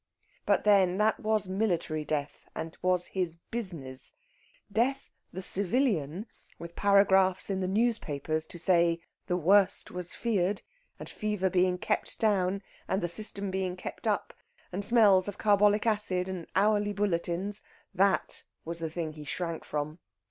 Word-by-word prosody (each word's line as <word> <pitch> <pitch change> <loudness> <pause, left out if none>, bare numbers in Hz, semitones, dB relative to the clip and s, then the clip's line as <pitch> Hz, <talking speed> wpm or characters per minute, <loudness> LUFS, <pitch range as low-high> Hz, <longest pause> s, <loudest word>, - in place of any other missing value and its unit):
But - - +3
then 190 -3 +4
that 215 +1 +2
was 215 -2 +1
military 185 -6 -1
death, 145 -1 -4
and 160 0 -5
was 180 -1 +2
his 180 -4 -2 0.2
business. 165 - -5 0.6
Death 265 +6 0 0.2
the 185 +2 -6
civilian, 195 - 0 0.3
with 170 0 -9
paragraphs 195 -1 +3
in 190 - -1
the 185 - -1
newspapers 160 - 0
to - - -6
say 170 -1 +3 0.3
"the 180 - +1
worst" 190 +3 +3
was 180 -1 -1
feared, 205 -4 0 0.3
and - - -9
the - - -10
fever 210 -3 -1
being 180 -1 +2
kept - - -1
down, 195 -2 +1 0.2
and 190 -1 -1
the - - +1
system 200 +1 -2
being 185 -1 -2
kept 180 - -7
up, - - -1 0.4
and 190 +3 -2
smells 205 -5 +5
of 205 - -5
carbolic 210 0 +3
acid 205 -5 +1
and 185 -3 -5
hourly 205 +1 +2
bulletins 195 0 -1 0.3
that 195 +1 +1 0.2
was 170 +1 -4
the 165 -1 -2
thing 160 -1 -4
he 150 -1 -9
shrank 165 +3 -4
from. 150 +2 -4
185 Hz, 150 wpm, -29 LUFS, 170-205 Hz, 0.6 s, smells